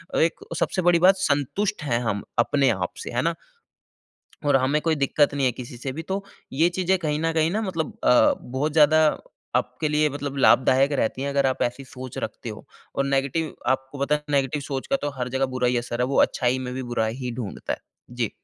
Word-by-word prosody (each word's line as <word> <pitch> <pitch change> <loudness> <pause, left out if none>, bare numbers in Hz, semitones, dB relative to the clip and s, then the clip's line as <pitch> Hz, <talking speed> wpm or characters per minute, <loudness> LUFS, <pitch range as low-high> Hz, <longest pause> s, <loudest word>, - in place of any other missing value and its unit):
और - - +3
1 165 - -1 0.2
सबसे 185 - 0
बड़ी 175 -1 +5
बात 185 +3 +6
संतुष्ट 185 +5 0
हैं 120 -5 0
हम 105 -3 -1 0.2
अपने 135 +3 +3
आप - - -2
से, - - -6
है - - 0
ना? - - +1 1.1
और 145 - +5
हमें 135 +3 +2
कोई 165 -1 +2
दिक्कत 145 +1 +3
नहीं 140 -2 +1
है 125 - +2
किसी 120 0 -9
से 130 +2 -4
भी 160 +5 -5
तो 190 +4 -3 0.3
ये 160 +6 +3
चीज़ें 185 0 +2
कहीं 150 -3 -1
न 165 0 0
कहीं 160 0 +2
ना 220 +2 0
मतलब 170 -6 -3
अ, 125 -3 +5
बहुत 135 +5 -2
ज़्यादा 155 0 +5 0.5
आपके 155 - -1
लिए 150 0 +2
मतलब 140 0 -5
लाभदायक 135 +1 +4
रहती 130 +4 -2
हैं 140 - -1
अगर 140 -1 +2
आप 130 - 0
ऐसी 125 +3 -2
सोच 130 -1 -9
रखते - - -5
हो। - - -10 0.3
और 140 - +1
नेगेटिव 140 +3 0 0.2
आपको 135 +2 -13
पता 150 - +2
है 150 - -12
नेगेटिव 140 0 +1
सोच 135 -1 -3
का 275 - +2
तो - - -1
हर 125 0 -2
जगह 135 - +2
बुरा 125 -1 +2
ही 125 - +1
असर 120 0 -4
है 125 - +2
वो - - +1
अच्छाई 125 0 +1
में 125 - -5
भी 130 - -3
बुरा 110 - +1
ही 125 +2 -4
ढूँढता 115 -6 -4
है। - - -5 0.3
जी। 120 -3 -2
140 Hz, 225 wpm, -24 LUFS, 130-155 Hz, 1.1 s, बात